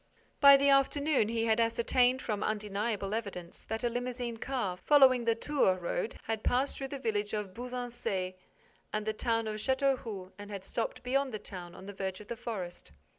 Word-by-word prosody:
By 280 -1 +9
the 280 +1 +3
afternoon, 275 -3 +3
he 230 0 0
had 220 0 +2
ascertained, 245 +2 +2
from 210 -3 -2
undeniable 210 -1 -2
evidence, 200 -6 -5
that 220 +1 -3
a - - +3
limousine 245 0 -3
car, 230 -7 -2
following 260 +2 +5
the 230 -1 +3
Tours 230 -7 +2
road, 175 +4 -2
had 220 -1 -2
passed 260 +3 +1
through 270 - -4
the 280 - -5
village 210 -4 -1
of 205 -3 -4
Buzancais 240 -6 -4 0.6
and 215 0 -2
the 220 - 0
town 230 0 0
of 215 0 -3
Châteauroux 245 -6 0
and 205 0 -8
had 200 -2 -6
stopped 230 +4 -3
beyond 265 +2 +1
the 215 - -3
town, 180 -4 -8
on 190 - -11
the 200 - -7
verge 190 -1 -4
of 210 - -13
the 235 - -3
forest. 200 - -6
225 Hz, 185 wpm, -31 LUFS, 205-250 Hz, 0.6 s, By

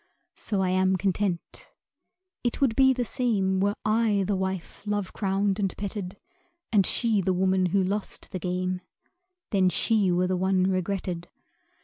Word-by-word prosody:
So 200 -3 -2
I 185 - +1
am 185 +1 +2
content. 190 -1 -2 0.7
It 240 - -1
would 260 -5 +2
be 265 -1 +6
the 250 -2 -1
same 200 -7 0
Were 200 +2 +1
I 215 -2 +2
the 200 - 0
wife 190 -2 -4
love 205 -2 -2
crowned 195 0 0
and 195 -2 -1
petted, 200 -1 -5 0.6
And 200 -3 +5
she 225 -4 +2
the 185 0 +1
woman 185 0 +2
who 190 +2 +2
lost 200 +2 -4
the 185 - -4
game 180 +1 -2 0.7
Then 190 -3 +3
she 200 +1 +2
were 180 +1 +2
the 185 0 0
one 185 0 +2
regretted. 185 -2 -2
190 Hz, 155 wpm, -26 LUFS, 185-205 Hz, 0.7 s, be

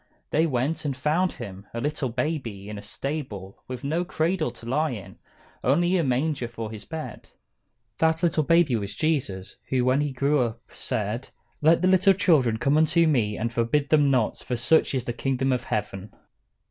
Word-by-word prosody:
They 160 +2 +3
went, 135 +3 -1
and 140 -4 -2
found 160 +6 +1
Him, 100 -4 -9
a - - -2
little 145 0 -2
baby, 120 -6 -3
in 105 -1 -6
a - - -8
stable, 105 -4 -6
with 125 -1 -6
no 160 +5 0
cradle 165 0 0
to - - -13
lie 150 +6 +1
in; 110 -8 -8 0.4
only 175 +7 +3
a 175 - +2
manger 135 0 0
for 115 -2 -6
His 110 -1 -9
bed. 160 -1 -7 0.7
That 160 +1 +2
little 165 -2 +3
baby 165 -3 +3
was 100 -2 -4
Jesus, 125 -11 -1
who 125 -2 +1
when 130 +3 +3
He 145 -1 -1
grew 140 +3 +1
up 115 -2 -1
said: 110 +4 -3 0.3
"Let 165 +3 +4
the - - +4
little 190 +1 +5
children 150 - +3
come 140 +6 +2
unto 165 +2 +4
me, 115 -9 +1
and 115 +1 -2
forbid 130 +5 +1
them 150 -2 +4
not, 125 -5 +1
for 125 - -3
of - - -4
such 145 +3 +3
is 125 -2 -2
the 120 - -2
kingdom 135 +1 0
of 125 -1 -1
heaven." 105 -1 -3
135 Hz, 190 wpm, -25 LUFS, 115-155 Hz, 0.7 s, little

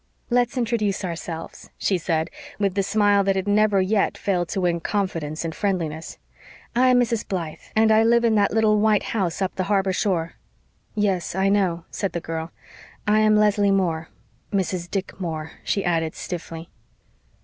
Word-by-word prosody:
"Let's 245 +1 +2
introduce 215 -5 0
ourselves," 165 -1 -6
she 190 -3 0
said, 160 0 -1 0.3
with 200 -2 0
the 200 - +1
smile 205 0 +3
that 195 0 +1
had 190 +1 -2
never 205 -1 +3
yet 195 +2 +1
failed 180 -4 -1
to 190 - -2
win 175 -1 +1
confidence 165 -5 -2
and 160 - -3
friendliness. 165 -6 -2 0.6
"I 255 +2 +4
am 250 -1 +5
Mrs. 230 -2 0
Blythe 170 -5 -4 0.2
and 220 0 +4
I 220 0 +6
live 235 +1 +4
in 230 - +3
that 205 -2 +3
little 215 -1 +3
white 215 -1 +3
house 190 -4 -1
up 190 - -2
the 185 - -2
harbor 195 -1 +1
shore." 170 -4 0 0.6
"Yes, 190 -6 0
I 190 +1 +2
know," 185 -4 +1
said 195 - -3
the 170 - -1
girl. 165 0 -5 0.6
"I 210 +1 +4
am 215 0 +4
Leslie 210 -1 +3
Moore 170 -5 0 0.4
Mrs. 185 -3 -1
Dick 195 -1 -4
Moore," 160 -3 -4
she 200 - -1
added 165 -2 0
stiffly. 165 -2 -7
195 Hz, 170 wpm, -23 LUFS, 170-210 Hz, 0.6 s, I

